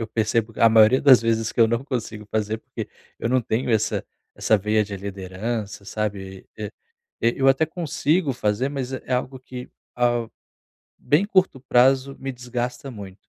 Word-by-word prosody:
eu 115 - -2
percebo 115 +1 0
a 115 - +6
maioria 110 +3 +6
das 130 -5 +7
vezes 115 -1 0
que - - -1
eu 110 - +6
não 120 +3 -1
consigo 115 -6 -4
fazer, 110 0 -1
porque - - -7 0.3
eu 115 - -2
não 130 0 +3
tenho 115 +2 -1
essa 110 -2 +1 0.3
essa 110 - +2
veia 105 +2 +1
de 100 - -7
liderança, 100 +2 -5
sabe? 100 -3 -4
Eh, 105 -2 -4 0.5
e 115 - +3
eu 135 0 +4
até 135 +4 +4
consigo 160 -1 0
fazer, 110 +3 0
mas 135 -2 -4
é 130 - -5
é 130 - 0
algo 130 +1 -2
que, 125 -1 -9 0.2
ao 120 -2 +1 0.7
bem 155 +7 +2
curto 185 -9 +2
prazo 135 +1 +3
me 135 0 -4
desgasta 125 +2 -4
muito, 100 -3 -10
115 Hz, 175 wpm, -23 LUFS, 110-130 Hz, 0.7 s, das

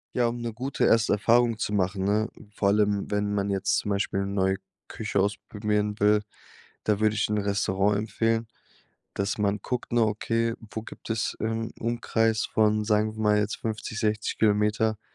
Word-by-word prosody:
Ja, 120 -1 +3
um 120 0 -3
'ne 115 -1 -3
gute 130 +4 -2
erste 115 -2 +4
Erfahrung 115 +2 +3
zu 105 - -2
machen, 95 0 0
ne, 105 +3 +1 0.2
vor 105 -1 0
allem 100 0 +2
wenn 105 0 0
man 100 0 0
jetzt 95 -1 +1
zum - - -2
Beispiel 100 -1 0
neue 95 -1 +1 0.3
Küche 105 -2 -2
ausprobieren 105 +1 -1
will, 105 +1 +4 0.6
da 105 -1 +1
würde 110 0 +2
ich 105 - +1
'n 105 - +1
Restaurant 100 0 +1
empfehlen, 115 +1 0 0.7
dass 100 +2 -1
man 105 0 +1
guckt 125 -2 -3
nur, 120 -2 +4
okay, 115 +2 0 0.2
wo 110 - -5
gibt - - -11
es 110 0 -1
im 115 0 -2
Umkreis 115 -1 +1
von, 105 -1 +2
sagen 110 0 +1
wir 110 - -5
mal 105 0 +4
jetzt, 105 0 -1
50, 110 0 -4
60 105 -1 -1
Kilometer, 105 0 +2
105 Hz, 175 wpm, -26 LUFS, 105-110 Hz, 0.7 s, erste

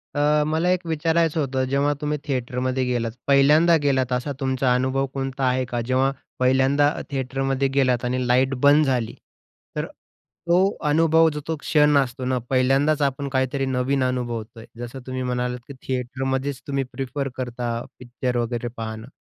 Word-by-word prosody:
अ, 150 +1 +3
मला 160 +3 +1
एक 180 -1 0
विचारायचं 165 0 +1
होतं, 135 -2 0
जेव्हा 140 +2 +2
तुम्ही 150 0 -1
थिएटरमध्ये 130 0 -1
गेलात, 120 -2 -1 0.2
पहिल्यांदा 150 +5 +5
गेलात 130 -3 +1
असा 125 +3 -1
तुमचा 130 -2 +1
अनुभव 130 +2 +1
कोणता 135 0 -3
आहे 130 +1 +1
का 120 -1 -3
जेव्हा 130 +2 +2 0.3
पहिल्यांदा 130 +3 +3
अ, - - -4
थिएटरमध्ये 135 0 -1
गेलात 130 -3 +2
आणि 125 0 -1
लाईट 130 +2 +3
बंद 145 +2 +6
झाली, 125 -4 0 0.6
तर - - -1 0.6
तो 170 +1 +4 0.3
अनुभव, 160 +1 +4
जो 150 -1 -5
तो 160 - -1
क्षण 150 -1 +3
असतो 130 -2 -1
ना, 130 0 0
पहिल्यांदाच 135 +4 +2
आपण 140 0 -1
काहीतरी 135 +1 0
नवीन 130 +1 0
अनुभवतो 120 -3 -3
आहे. 115 - -12
जसं 120 +2 -6
तुम्ही 130 0 -3
म्हणालात, 125 0 -2
की 140 - -8
थिएटरमध्येच 130 +1 -2
तुम्ही 140 -1 0
प्रिफर 135 +1 -3
करता 120 -1 -3 0.3
पिक्चर 125 0 -3
वगैरे 120 0 -2
पाहणं, 110 0 -6
130 Hz, 160 wpm, -23 LUFS, 125-145 Hz, 0.6 s, बंद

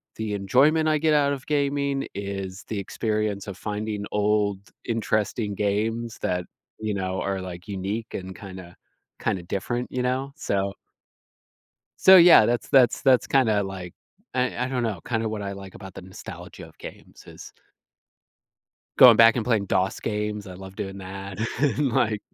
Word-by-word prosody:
the 110 -2 -3
enjoyment 145 +11 +3
I 155 - +3
get 155 0 +2
out 140 -1 +3
of 135 - -7
gaming 140 -1 0
is 100 -1 -5
the 110 - -4
experience 105 0 -2
of 100 -1 -7
finding 105 -1 -4
old 105 -1 +1 0.3
interesting 110 -2 -1
games 110 +3 -1
that, 90 0 -1 0.4
you 110 -1 -2
know, 95 -1 -2
are, 95 -1 -2
like, 90 +1 -8
unique 100 +3 -4
and 95 0 -6
kinda 95 -4 -10 0.5
kinda 95 -6 -1
different, 120 +7 -3
you 125 - -2
know? 130 +2 -1
So 100 -5 -1 1.3
so, 190 0 +9
yeah, 170 -11 +9
that's 120 0 -1
that's 125 -3 +4
that's 130 -3 +4
kinda, 110 -7 +2
like, 95 -3 -7 0.4
I 125 0 0
I - - -3
don't 125 -2 -1
know, 105 -7 -2
kind 115 -2 -1
of 110 - -2
what 105 -2 -4
I 100 0 -4
like 95 -1 -10
about 95 -2 -11
the - - -8
nostalgia 95 +1 -10
of - - -21
games, - - -12
is - - -12 1.5
going 120 -3 +10
back 115 +1 +7
and 120 - -1
playing 110 -5 +1
DOS 95 +1 0
games, 105 -1 -3
I 90 - -9
love 95 +1 -11
doing 95 0 -5
that, 95 0 -8 0.2
and, 145 -1 +1
like, 110 -4 +1
105 Hz, 165 wpm, -25 LUFS, 95-125 Hz, 1.5 s, going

